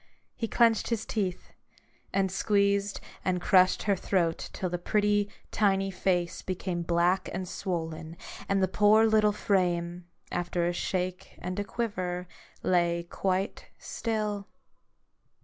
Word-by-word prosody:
He 230 Hz, -, -2 dB
clenched 230 Hz, -1 st, +3 dB
his 230 Hz, -2 st, -1 dB
teeth, 190 Hz, -5 st, -3 dB, 0.6 s
and 195 Hz, -1 st, +1 dB
squeezed 200 Hz, 0 st, +1 dB, 0.2 s
and 185 Hz, -1 st, +1 dB
crushed 185 Hz, 0 st, +4 dB
her 200 Hz, -2 st, +2 dB
throat 175 Hz, -3 st, 0 dB
till 185 Hz, -, -3 dB
the 175 Hz, 0 st, -3 dB
pretty 205 Hz, +1 st, +2 dB, 0.2 s
tiny 195 Hz, -2 st, +2 dB
face 180 Hz, -2 st, 0 dB
became 185 Hz, -1 st, -3 dB
black 170 Hz, +2 st, +2 dB
and 185 Hz, 0 st, -4 dB
swollen, 165 Hz, -3 st, -4 dB, 0.3 s
and 195 Hz, -1 st, +2 dB
the -, -, +4 dB
poor 210 Hz, +3 st, +5 dB
little 215 Hz, -1 st, +4 dB
frame, 175 Hz, -4 st, 0 dB, 0.2 s
after 175 Hz, 0 st, -1 dB
a 175 Hz, -, +1 dB
shake 185 Hz, +1 st, -3 dB
and 185 Hz, +2 st, -4 dB
a -, -, 0 dB
quiver, 185 Hz, -5 st, -3 dB, 0.4 s
lay 170 Hz, -1 st, +2 dB
quite 190 Hz, +2 st, -1 dB
still. 210 Hz, -3 st, -3 dB
190 Hz, 130 wpm, -29 LUFS, 175-205 Hz, 0.6 s, poor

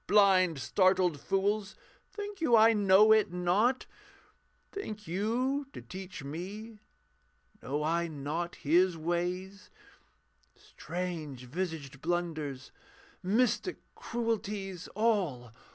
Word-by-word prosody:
Blind, 190 Hz, -5 st, +5 dB
startled 185 Hz, +1 st, +2 dB
fools 200 Hz, +3 st, 0 dB, 0.4 s
think 410 Hz, -3 st, -7 dB
you 245 Hz, -8 st, +4 dB
I 225 Hz, +1 st, +7 dB
know 205 Hz, +1 st, +6 dB
it 215 Hz, -4 st, +4 dB
not? 185 Hz, +9 st, +1 dB, 0.9 s
Think 215 Hz, -, -6 dB
you 245 Hz, -, -1 dB
to -, -, -7 dB
teach 185 Hz, -4 st, -8 dB
me? 200 Hz, +9 st, -7 dB, 0.8 s
Know 145 Hz, +3 st, -2 dB
I 170 Hz, +2 st, +1 dB
not 160 Hz, +3 st, -4 dB
His 175 Hz, +3 st, +3 dB
ways? 180 Hz, +4 st, -3 dB, 0.9 s
Strange 155 Hz, -5 st, -6 dB
visaged 145 Hz, -2 st, -5 dB
blunders, 155 Hz, -6 st, -3 dB, 0.5 s
mystic 235 Hz, -, +1 dB, 0.2 s
cruelties. 210 Hz, -6 st, -3 dB
All! 185 Hz, -, 0 dB
185 Hz, 95 wpm, -31 LUFS, 165-215 Hz, 0.9 s, I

